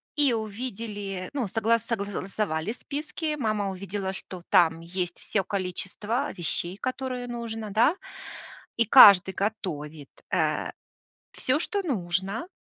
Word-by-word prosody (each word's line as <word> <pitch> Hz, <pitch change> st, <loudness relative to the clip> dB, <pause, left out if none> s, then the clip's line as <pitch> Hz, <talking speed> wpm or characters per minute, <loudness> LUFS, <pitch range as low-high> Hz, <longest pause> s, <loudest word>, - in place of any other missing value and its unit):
и 290 Hz, -4 st, +4 dB
увидели, 210 Hz, -4 st, -4 dB
ну, 265 Hz, -6 st, -1 dB
согла 225 Hz, +4 st, +2 dB
согласовали 200 Hz, -5 st, -3 dB
списки, 300 Hz, +4 st, -4 dB
мама 215 Hz, -4 st, 0 dB
увидела, 195 Hz, 0 st, -4 dB
что 185 Hz, -1 st, -7 dB
там 165 Hz, -4 st, +4 dB
есть 175 Hz, +1 st, -4 dB
всё 195 Hz, -3 st, -1 dB
количество 200 Hz, +5 st, -2 dB
вещей, 175 Hz, +2 st, 0 dB
которое 255 Hz, 0 st, -3 dB
нужно, 230 Hz, -2 st, -5 dB
да. 235 Hz, -, +4 dB, 0.8 s
И 230 Hz, -, +4 dB
каждый 200 Hz, -6 st, +9 dB
готовит, 160 Hz, -9 st, -4 dB, 0.2 s
э, -, -, +1 dB, 0.6 s
всё, 260 Hz, +4 st, 0 dB
что 400 Hz, +4 st, -1 dB
нужно, 195 Hz, -, -2 dB
205 Hz, 115 wpm, -27 LUFS, 185-240 Hz, 0.8 s, каждый